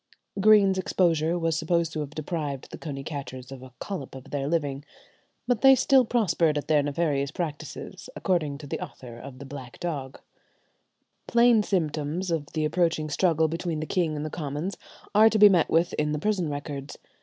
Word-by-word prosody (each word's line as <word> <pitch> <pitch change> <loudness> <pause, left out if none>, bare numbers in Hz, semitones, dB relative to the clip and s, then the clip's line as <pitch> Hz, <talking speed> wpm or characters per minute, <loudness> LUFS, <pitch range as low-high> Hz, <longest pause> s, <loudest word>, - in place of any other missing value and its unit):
Greene's 200 -2 +5
exposure 170 -3 +1
was 165 -2 0
supposed 165 0 0
to 155 - -3
have 150 -2 -3
deprived 150 -3 -4
the - - -7
coney 140 -4 -6
catchers 130 -3 -7
of 135 -2 -8
a 130 0 -12
"collop 175 -10 -6
of 130 - -11
their 140 -1 -2
living." 145 -3 -1 0.6
But 245 -3 0
they 270 0 +8
still 265 -1 +4
prospered 180 -10 +2
at 145 - -4
their 150 -2 +4
nefarious 145 -1 0
practices, 160 +3 -6
according 155 -7 0
to 150 - -10
the 140 - -4
author 120 -2 -10
of 130 0 -10
the 140 - -9
"Black 130 -3 -9
Dogge." 140 -6 -4 1.1
Plain 235 -1 +5
symptoms 165 -2 -1
of 155 -3 -1
the 155 -1 0
approaching 155 -1 0
struggle 160 -1 +2
between 165 0 -3
the 155 - -3
king 165 -2 0
and 150 +1 -3
the 155 - -5
commons 155 +4 -4 0.4
are 215 +2 +7
to 220 - +1
be 210 0 +9
met 175 -5 +3
with 165 +2 +2
in 150 0 0
the - - -1
prison 190 -3 0
records. 145 -1 -6
155 Hz, 185 wpm, -26 LUFS, 145-180 Hz, 1.1 s, be